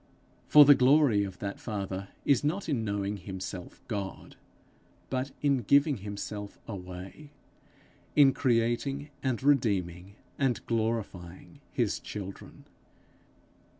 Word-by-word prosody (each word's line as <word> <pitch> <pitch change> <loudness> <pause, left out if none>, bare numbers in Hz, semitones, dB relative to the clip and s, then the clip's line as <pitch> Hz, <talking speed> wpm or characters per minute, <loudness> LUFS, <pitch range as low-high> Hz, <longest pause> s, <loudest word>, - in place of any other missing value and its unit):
For 150 -1 +9
the 145 - +9
glory 130 -5 +4
of 95 -2 -6
that 100 -1 -5
Father 100 -3 -4 0.2
is 140 -2 +3
not 170 +7 -1
in 135 -8 0
knowing 100 -1 -2
himself 95 -1 -7
God, 100 -4 -5 0.8
but 130 +1 -1
in 140 -2 +3
giving 140 +4 +3
himself 100 0 -6
away 95 +7 -8 0.9
in 140 -2 +7
creating 125 +5 0
and 130 -2 -1
redeeming 100 -9 +1 0.2
and 135 -4 0
glorifying 110 -6 -3
his - - 0
children. 100 -2 -8
110 Hz, 110 wpm, -29 LUFS, 100-135 Hz, 0.9 s, For